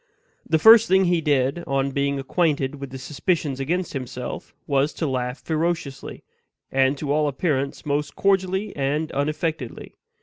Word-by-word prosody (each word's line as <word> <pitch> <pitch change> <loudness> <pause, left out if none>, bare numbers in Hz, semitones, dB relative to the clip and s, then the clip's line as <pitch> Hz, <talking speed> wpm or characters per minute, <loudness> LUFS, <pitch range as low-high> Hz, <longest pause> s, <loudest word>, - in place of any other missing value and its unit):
The 160 - +4
first 225 +7 +8
thing 190 0 +4
he 175 -1 +2
did, 145 +1 +1
on 135 0 0
being 140 +1 0
acquainted 140 -1 0
with 140 - -5
the 130 - -7
suspicions 145 +1 -2
against 170 +6 -2
himself, 125 -2 -6
was 140 +1 +1
to 165 - -3
laugh 125 -2 -2
ferociously, 160 -4 -3 0.5
and 135 +1 +2
to 140 0 -3
all 150 0 +2
appearance 140 -1 -2
most 145 0 -1
cordially 195 +1 +1
and 145 +3 -1
unaffectedly. 150 -2 -3
145 Hz, 145 wpm, -23 LUFS, 135-165 Hz, 0.5 s, first